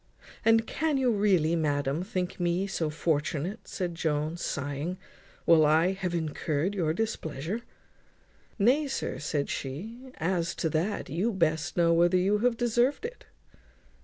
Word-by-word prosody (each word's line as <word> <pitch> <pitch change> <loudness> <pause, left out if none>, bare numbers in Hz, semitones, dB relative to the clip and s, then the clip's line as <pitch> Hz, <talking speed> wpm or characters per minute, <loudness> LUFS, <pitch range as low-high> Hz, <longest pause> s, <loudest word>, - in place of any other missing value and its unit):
"And 225 0 +4
can 310 +2 0
you 255 -2 +2
really, 190 -6 +3
madam, 145 -1 0
think 185 -2 -3
me 175 +2 +1
so 170 -5 -2
fortunate," 155 +4 -2
said 180 -3 -3
Jones, 160 0 -1
sighing, 145 +5 -3 0.5
"while 165 -2 +6
I 160 +4 +4
have 185 -2 -3
incurred 160 +2 -1
your 170 -6 0
displeasure?" 170 - -3 1.0
"Nay, 255 +8 +3
sir," 270 - -3
says 145 -1 -2
she, 220 - -6
"as 170 +1 -1
to 160 - -1
that 165 +1 -1
you 185 +10 0
best 160 -5 0
know 170 -1 +4
whether 175 +2 +4
you 200 +3 +2
have 240 +1 +2
deserved 240 - +1
it." - - -7
175 Hz, 140 wpm, -28 LUFS, 155-210 Hz, 1.0 s, while